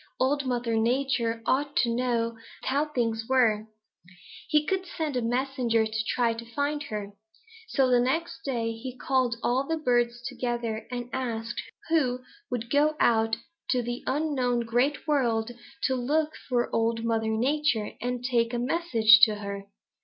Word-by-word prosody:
Old 275 +1 +1
Mother 240 -2 0
Nature 235 -1 0
ought 285 +2 +1
to 235 -1 +2
know 235 -2 0 0.3
how 285 +3 +1
things 230 -6 -2
were. 220 -5 +3 0.8
He 300 0 +3
would 380 -1 0
send 310 -5 -3
a 250 - +1
messenger 240 -1 +1
to 220 0 -2
try 235 -2 +2
to 230 0 -10
find 290 +1 0
her. 210 -5 -5 0.6
So 270 -11 +2
the 250 -1 +4
next 295 +8 -1
day 235 -4 -1
he 245 +3 -7
called 255 -3 +1
all 260 +3 +1
the 325 - 0
birds 240 -4 +1
together 235 -3 -3
and 245 -1 -4
asked 235 -3 -3 0.3
who 260 -6 +2 0.3
would 240 -1 -4
go 300 +2 +3
out 225 -1 +3 0.3
into 250 -2 +2
the 240 0 -3
unknown 260 -5 +1
Great 245 +7 0
World 240 -6 +1 0.3
to 265 - +2
look 300 +5 +1 0.2
for 245 -2 0
Old 230 0 +1
Mother 225 -1 0
Nature 265 -3 +1
and 245 +1 -2
take 240 -1 +1
a - - 0
message 240 -5 +5
to 215 -2 -2
her. 200 -1 -6
245 Hz, 155 wpm, -27 LUFS, 230-270 Hz, 0.8 s, message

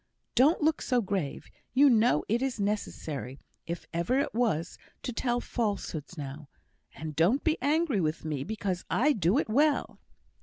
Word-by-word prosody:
Don't 290 +6 +4
look 315 0 +2
so 250 -2 +2
grave. 185 -9 -2 0.3
You 285 +2 +7
know 230 - +4
it 230 +3 +1
is 265 -4 -1
necessary, 155 -10 -3 0.3
if 170 0 -4
ever 170 +10 +1
it 280 - 0
was, 215 -9 0 0.2
to 250 - -3
tell 240 +1 0
falsehoods 200 - -3
now; 140 0 -7 0.5
and 155 -2 -6
don't 180 - +3
be 320 -1 +3
angry 290 - +2
with 155 0 -2
me 150 -4 -2
because 195 -1 -3
I 295 +6 +3
do 195 - +2
it - - +1
well." 285 +6 +2
210 Hz, 160 wpm, -29 LUFS, 160-260 Hz, 0.5 s, You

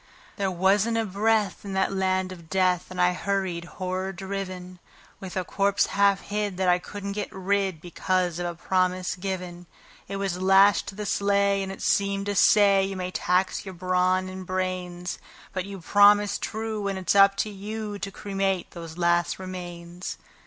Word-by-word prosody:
There 195 -2 -1
wasn't 195 +5 +2
a 225 - +1
breath 210 +1 +1
in 200 -1 -6
that 190 0 +1
land 185 -1 0
of 170 -3 -11
death, 185 -2 +1
and 185 - -7
I 180 0 +4
hurried, 185 -3 -2
horror 185 0 -2
driven, 185 -1 -6 0.4
With 190 -1 -7
a 185 - 0
corpse 200 +2 +1
half 200 0 +3
hid 205 -2 -3
that 190 -1 0
I 180 0 +4
couldn't 200 +2 -6
get 210 +1 -4
rid, 190 -2 -1
because 180 0 -1
of 175 - -2
a 175 - -4
promise 185 +1 0
given; 180 -2 -5 0.4
It 195 - -5
was 195 -2 -2
lashed 195 +2 +5
to 195 - -7
the 210 +1 -5
sleigh, 200 0 +2
and 190 0 -4
it 195 - -8
seemed 200 0 +1
to 205 0 -2
say: 200 -1 +5
"You 195 0 -3
may 185 0 -3
tax 185 +1 0
your 190 -2 -8
brawn 185 +1 +1
and 185 0 -7
brains, 180 -1 -3 0.3
But 185 -1 -2
you 200 -1 -8
promised 205 +2 +5
true, 220 -2 -3
and 195 -1 -2
it's 185 - 0
up 195 0 +6
to 215 - -6
you 210 +1 -5
to 195 - -4
cremate 195 -2 -2
those 165 -1 -9
last 175 0 +2
remains." 175 -1 -7
190 Hz, 180 wpm, -26 LUFS, 180-200 Hz, 0.4 s, up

